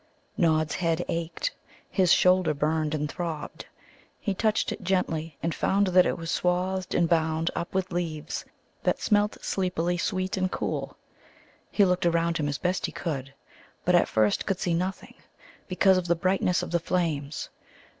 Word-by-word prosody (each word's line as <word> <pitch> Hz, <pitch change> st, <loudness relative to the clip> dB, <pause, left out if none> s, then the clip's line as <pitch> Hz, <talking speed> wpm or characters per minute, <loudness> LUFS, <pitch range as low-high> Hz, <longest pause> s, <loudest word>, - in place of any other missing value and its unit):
Nod's 155 Hz, -4 st, +2 dB
head 165 Hz, -1 st, 0 dB
ached; 170 Hz, -, -2 dB, 0.4 s
his 185 Hz, -4 st, +2 dB
shoulder 180 Hz, -4 st, +4 dB
burned 155 Hz, +1 st, 0 dB
and 150 Hz, 0 st, -1 dB
throbbed. 160 Hz, 0 st, -5 dB, 0.5 s
He 200 Hz, -, -1 dB
touched 215 Hz, +2 st, +1 dB
it -, -, -5 dB
gently, 165 Hz, -5 st, -1 dB
and 165 Hz, 0 st, 0 dB
found 200 Hz, +1 st, +2 dB
that 180 Hz, 0 st, +5 dB
it -, -, -1 dB
was 165 Hz, -1 st, -4 dB
swathed 180 Hz, +1 st, 0 dB
and 170 Hz, -, +3 dB
bound 160 Hz, 0 st, +1 dB
up 170 Hz, -, -3 dB
with 190 Hz, -1 st, 0 dB
leaves 160 Hz, -3 st, -3 dB, 0.4 s
that -, -, +1 dB
smelt 210 Hz, -1 st, +2 dB
sleepily 175 Hz, -2 st, 0 dB
sweet 185 Hz, +1 st, -1 dB
and 185 Hz, 0 st, 0 dB
cool. -, -, -3 dB, 0.7 s
He 205 Hz, -, +4 dB
looked 180 Hz, -1 st, +2 dB
around 170 Hz, 0 st, +1 dB
him 145 Hz, -1 st, 0 dB
as 140 Hz, -, -2 dB
best 180 Hz, +1 st, -1 dB
he -, -, -7 dB
could, 135 Hz, -6 st, -4 dB, 0.5 s
but -, -, +3 dB
at -, -, +5 dB
first 110 Hz, -2 st, +1 dB
could 195 Hz, -3 st, 0 dB
see 175 Hz, -, 0 dB
nothing, 185 Hz, +3 st, -3 dB, 0.5 s
because 190 Hz, +1 st, +4 dB
of 180 Hz, -, -5 dB
the 170 Hz, -, +3 dB
brightness 185 Hz, +1 st, +1 dB
of -, -, -6 dB
the 170 Hz, -, +2 dB
flames. 160 Hz, -5 st, -2 dB
175 Hz, 165 wpm, -27 LUFS, 160-185 Hz, 0.7 s, that